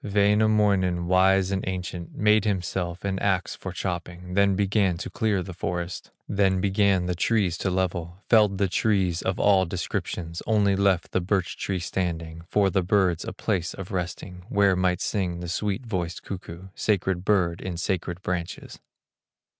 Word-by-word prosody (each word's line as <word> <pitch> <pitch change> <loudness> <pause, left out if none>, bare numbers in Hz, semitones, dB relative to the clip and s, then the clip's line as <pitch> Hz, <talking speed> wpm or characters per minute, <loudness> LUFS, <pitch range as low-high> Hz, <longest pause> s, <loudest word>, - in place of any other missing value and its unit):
Wainamoinen, 100 -3 +2
wise 95 +1 +3
and 95 -1 -1
ancient, 90 -2 -5
Made 105 0 +4
himself 90 -3 -2
an 95 -1 -1
axe 95 -2 0
for 95 - -7
chopping, 90 0 -5
Then 100 0 +3
began 100 -2 +1
to 95 - -6
clear 105 -4 0
the 95 +1 -8
forest, 85 0 -4 0.2
Then 95 -2 +2
began 95 -1 +2
the 90 - 0
trees 95 0 +1
to 95 - 0
level, 90 0 -2
Felled 105 -4 +4
the 100 0 +2
trees 95 -3 +1
of 95 +1 -2
all 95 -3 +4
descriptions, 85 -1 -4
Only 105 -3 +3
left 95 -2 +1
the 90 - +1
birch 95 0 0
tree 95 - -2
standing 85 -2 -3
For 100 -2 +3
the 95 - +2
birds 90 -2 +2
a - - -4
place 85 -2 -2
of 95 0 -8
resting, 90 0 -5
Where 100 -2 +3
might 90 -1 +1
sing 90 -4 -1
the 90 - -5
sweet 105 +6 -2
voiced 90 -6 -3
cuckoo, 95 -1 -8
Sacred 95 -4 0
bird 95 -4 +1
in 90 -2 -4
sacred 90 0 -2
branches. 90 -2 -4
95 Hz, 160 wpm, -25 LUFS, 90-100 Hz, 0.2 s, Made